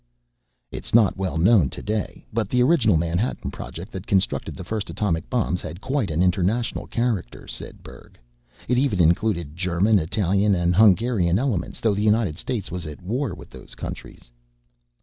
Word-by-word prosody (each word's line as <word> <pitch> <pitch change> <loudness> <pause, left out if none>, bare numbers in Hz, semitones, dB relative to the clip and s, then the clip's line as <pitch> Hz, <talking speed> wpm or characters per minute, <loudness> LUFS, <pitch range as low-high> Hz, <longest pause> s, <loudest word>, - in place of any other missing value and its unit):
"It's - - -3
not 115 -4 +5
well 95 -3 -2
known 90 - +4
today, 105 +7 -4
but 110 -3 -1
the 125 0 +3
original 125 - +4
Manhattan 85 +8 -1
Project 90 +6 -8
that 95 0 -7
constructed 95 -2 0
the - - -7
first 105 +2 -4
atomic 85 -6 -2
bombs 110 -7 0
had 80 +3 -7
quite 130 -3 -1
an 80 +3 +1
international 95 +6 0
character," 115 - -2
said - - -7
Berg. - - -14 0.5
"It 125 +1 +2
even 130 -9 +1
included 85 -2 +1
German, 95 +4 +2
Italian, 100 +3 +1
and 85 0 +1
Hungarian 100 -3 +4
elements 115 -8 -2
though 110 -2 +2
the 100 - -1
United 105 -6 +2
States 115 -8 -3
was 90 -2 -5
at 75 +2 -9
war 115 +1 -2
with - - -13
those 65 0 -11
countries." - - -9
100 Hz, 165 wpm, -23 LUFS, 85-115 Hz, 0.5 s, not